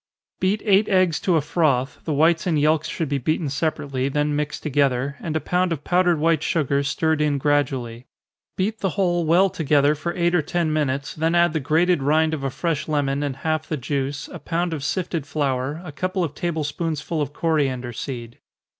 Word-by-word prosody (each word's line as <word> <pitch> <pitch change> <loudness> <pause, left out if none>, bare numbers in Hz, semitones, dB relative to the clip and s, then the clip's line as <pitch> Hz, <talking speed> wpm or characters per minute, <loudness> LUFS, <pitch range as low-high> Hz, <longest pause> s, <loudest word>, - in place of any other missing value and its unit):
_ - - -52
Beat 195 +3 0
eight 205 0 +4
eggs 185 -4 +3
to 180 - +1
a 160 - +3
froth 140 -4 0
the 160 - -2
whites 165 +4 +3
and 160 -4 +2
yelks 155 +1 +2
should 165 - -3
be 140 0 -1
beaten 155 +3 -1
separately, 140 -2 -1
then 150 +1 0
mixed 150 0 -3
together, 140 -2 +1
and 160 -2 -4
a - - +2
pound 180 +2 0
of 150 -3 -3
powdered 180 -1 +2
white 160 0 +2
sugar 140 -4 +1
stirred 155 +2 0
in 150 -2 +2
gradually. 130 -4 -1 0.5
Beat 210 +4 -1
the 195 -2 -2
whole 175 -4 +1
well 180 +4 +5
together, 150 -4 +2
for 165 +3 -4
eight 175 0 +1
or 175 - +4
ten 160 +1 -1
minutes, 140 -2 -1
then 160 +2 0
add 175 -2 +4
the 160 - 0
grated 160 +3 +2
rind 155 +3 +2
of 145 -3 -3
a 135 - 0
fresh 165 +2 -2
lemon, 145 -2 0
and 140 -2 -2
half 155 -1 0
the 155 - -1
juice, 140 +2 -3
a 170 - -8
pound 165 +3 -2
of 150 -4 -4
sifted 165 -2 -2
flour, 140 0 -1
a 155 - -6
couple 185 +4 -2
of 155 -4 -3
table 160 0 -2
spoonsful 155 +1 -3
of 145 -1 -2
coriander 135 -6 -1
seed. 120 -1 -6
155 Hz, 205 wpm, -23 LUFS, 140-170 Hz, 0.5 s, well